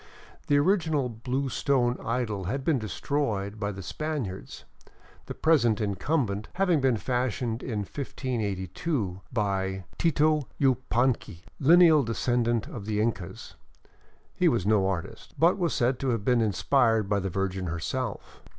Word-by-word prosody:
The 145 - +4
original 155 -5 +2
blue 125 +4 -2
stone 125 -3 +1
idol 115 -5 -2
had 135 +9 -2
been 150 -6 +2
destroyed 110 - -2
by 100 -1 -1
the 95 -1 -8
Spaniards, 140 - -5 0.6
the - - -6
present 120 -10 +3
incumbent 105 - -1
having 180 -5 +2
been 130 -3 +2
fashioned 120 0 -1
in 110 -5 -3
1582 105 - -3
by 95 -4 -1 0.2
Tito 155 -3 +2
Yupanqui, 125 - +1 0.2
lineal 160 +1 +7
descendant 120 -1 0
of 110 -4 -8
the 105 -1 -1
Incas. 105 -6 -3 0.8
He 180 - +2
was 120 - +2
no 105 -2 +3
artist, 95 -1 -5
but 170 +4 +3
was 170 -4 +1
said 125 +1 +1
to 135 - -1
have 115 -4 -1
been 125 -2 +3
inspired 115 +1 +2
by 100 0 +1
the 95 0 -2
Virgin 95 0 -2
herself. 100 +7 -4
120 Hz, 135 wpm, -27 LUFS, 100-140 Hz, 0.8 s, lineal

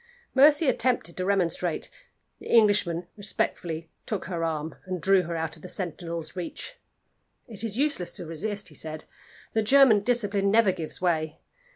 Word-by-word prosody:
Mercy 290 +3 +6
attempted 245 -11 +1
to 185 - -2
remonstrate. 180 -3 0 0.5
The - - -11
Englishman 205 -6 +4
respectfully 170 -5 -2 0.2
took 210 -4 -3
her 170 -3 -3
arm, 160 -1 -2
and 185 -1 -3
drew 195 +3 +4
her 170 -1 -5
out 160 0 -2
of - - -17
the 180 - -9
sentinel's 170 -2 -5
reach. 185 - -6 0.7
"It 220 -3 -3
is 225 -1 -3
useless 280 - +1
to - - -6
resist," 200 +6 -3
he - - -15
said. 155 -1 -4 0.5
"The 220 - +2
German 250 -1 +6
discipline 205 -3 +1
never 215 -1 +4
gives 170 -3 -7
way. 160 -3 0
185 Hz, 160 wpm, -26 LUFS, 165-215 Hz, 0.7 s, Mercy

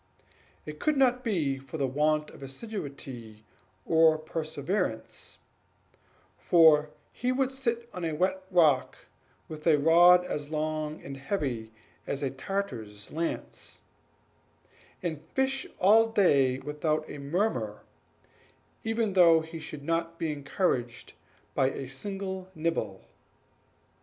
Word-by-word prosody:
It 150 0 -8
could 305 -2 +1
not 250 -2 +3
be 155 - 0
from 135 +3 -8
the 140 - +1
want 150 +3 +1
of - - -14
assiduity 135 - -8 0.4
or 160 -1 +5
perseverance; 155 - -3 1.0
for 155 -3 +5 0.2
he 250 +1 -1
would 260 0 +1
sit 235 -3 -2
on 180 - -6
a 165 -1 -1
wet 190 +3 0
rock, 155 -8 +3 0.5
with 155 +1 -7
a 155 -3 +6
rod 175 +4 +6
as 145 -4 -4
long 155 0 -3
and 135 0 -7
heavy 130 - -3 0.4
as 140 +1 -3
a 135 - 0
Tartar's 130 - -5
lance, 165 +2 -5 1.2
and 160 -4 -3
fish 265 0 0
all 220 +4 +6
day 140 - +3
without 155 +2 -2
a - - -8
murmur, 140 - -1 1.0
even 225 -2 0
though 170 -3 +6
he 160 +1 -8
should 150 -2 -8
not 165 +1 -1
be 165 -2 -1
encouraged 140 -4 -2 0.4
by 130 - +2
a 135 0 -6
single 190 +6 -5
nibble. 155 - -2
155 Hz, 120 wpm, -29 LUFS, 140-190 Hz, 1.2 s, a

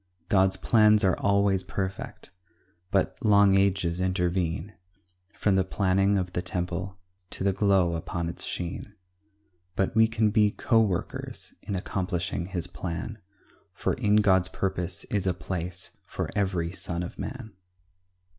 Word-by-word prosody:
God's 95 -1 +3
plans 110 -1 +4
are 95 -1 +4
always 100 -1 +3
perfect, 95 -1 -5 0.6
But 95 -1 0
long 100 -2 +5
ages 95 -3 +1
intervene 90 0 -1 0.6
From 100 -2 +2
the 95 - +3
planning 95 +1 +2
of 90 -1 -2
the 90 - -1
temple 90 +1 -3 0.3
To - - -4
the 100 0 +2
glow 95 -3 +3
upon 85 +1 -3
its 85 - -4
sheen; 90 +4 -5 0.8
But 95 - 0
we 110 0 +6
can 110 -1 +1
be 105 -1 +4
co 115 +2 +2
workers 95 -6 -3
In 100 - -4
accomplishing 90 -1 -2
his 90 -3 -2
plan; 95 +5 -5 0.6
For - - 0
in 105 0 +2
God's 95 -3 +4
purpose 90 -2 -2
is 100 -2 0
a 90 - +1
place 90 -1 -4 0.2
For - - -4
every 95 -5 0
son 90 -2 -3
of 90 - -8
man. 125 -5 -6
95 Hz, 140 wpm, -27 LUFS, 90-100 Hz, 0.8 s, we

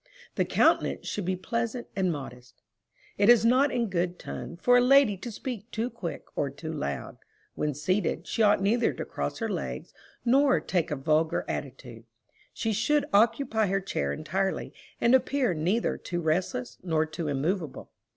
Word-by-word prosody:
The - - +1
countenance - - +2
should 205 - -3
be 185 +1 0
pleasant 230 +5 -3
and 190 -2 +1
modest. 125 -4 -9 0.6
It 205 +2 +5
is 240 -2 +7
not 260 +4 +4
in 240 -2 0
good 180 -1 -1
ton 170 - -7
for 245 +6 +4
a 245 - +6
lady 260 -4 +5
to 235 +6 -7
speak 225 -1 -6
too 235 +2 -2
quick 205 -8 -6
or 140 - 0
too 155 +4 -7
loud. 70 - -4 0.4
When 150 -2 -2
seated, 170 +3 -1
she - - -2
ought 205 -2 +4
neither 230 +4 +2
to - - -5
cross - - -4
her - - -2
legs, - - -5 0.3
nor 265 +2 +4
take 175 -4 -1
a 150 - -1
vulgar 155 +4 +1
attitude. 125 -4 -6 0.5
She 225 -1 -2
should 290 +8 +2
occupy 220 +1 +3
her 195 +1 +1
chair 70 - -2
entirely, 190 - -2 0.3
and 235 - +3
appear 260 -3 +2
neither 180 +9 0
too 175 - -4
restless, 180 +10 -1
nor 160 -3 +1
too 160 +1 -5
immovable. 150 +2 -2
195 Hz, 170 wpm, -28 LUFS, 160-235 Hz, 0.6 s, is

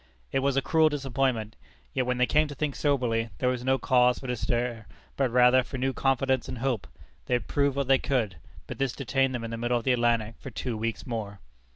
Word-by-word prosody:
It 135 - +1
was 135 0 +1
a 135 - +2
cruel 160 -1 +4
disappointment. 130 -6 -1 0.4
Yet 130 - 0
when 125 0 0
they 125 - +4
came 150 +4 +2
to 145 - -8
think 145 0 -2
soberly, 120 -6 0
there 125 - +1
was 125 -1 -2
no 130 +1 +2
cause 125 -1 +3
for - - -10
despair, 120 -2 -2 0.3
but 135 -2 +1
rather 125 +1 +5
for 130 +1 -7
new 130 +1 0
confidence 135 -1 +1
and - - -5
hope. 120 -4 -1 0.4
They 125 - +2
had 120 - -3
proved 140 -1 +1
what 140 -2 -1
they 135 0 +5
could 125 -7 0
do. - - -16 0.3
But - - -8
this 135 -2 0
detained 135 -1 0
them 120 - -4
in 115 - -5
the 115 - -4
middle 120 +1 +1
of 120 - -4
the 130 - +3
Atlantic 115 -2 +1
for - - -8
two 125 0 -4
weeks 115 +1 -3
more. 105 -4 -5
125 Hz, 235 wpm, -27 LUFS, 120-135 Hz, 0.4 s, rather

